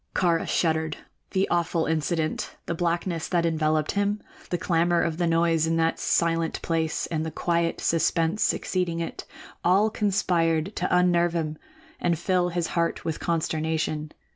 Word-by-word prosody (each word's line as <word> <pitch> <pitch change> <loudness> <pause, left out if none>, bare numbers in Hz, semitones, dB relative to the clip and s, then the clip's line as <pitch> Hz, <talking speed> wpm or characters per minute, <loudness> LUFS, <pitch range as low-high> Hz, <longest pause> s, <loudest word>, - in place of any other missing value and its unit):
Kāra 170 -3 +2
shuddered. 160 -2 0 0.3
The 190 0 +1
awful 170 -1 +1
incident, 160 0 -1
the - - -2
blackness 170 0 -1
that 170 -2 +1
enveloped 155 -2 +1
him, 205 +1 0 0.3
the 175 - 0
clamor 170 0 +2
of 165 0 -2
noise 165 -1 +2
in 165 - +1
that 165 0 +1
silent 165 -1 +1
place 165 -1 0
and 160 -1 0
the 160 - -3
quiet 170 +1 0
suspense 165 +3 +1
succeeding 180 -3 0
it, 165 - -5 0.4
all 195 +5 +4
conspired 180 -4 +1
to 180 - 0
unnerve 175 -1 +3
him 155 -2 -2 0.4
and 170 -2 +1
fill 180 +1 +1
his 175 -1 -1
heart 170 -1 -1
with 160 -2 -2
consternation. 160 -2 -1
170 Hz, 145 wpm, -26 LUFS, 160-175 Hz, 0.4 s, all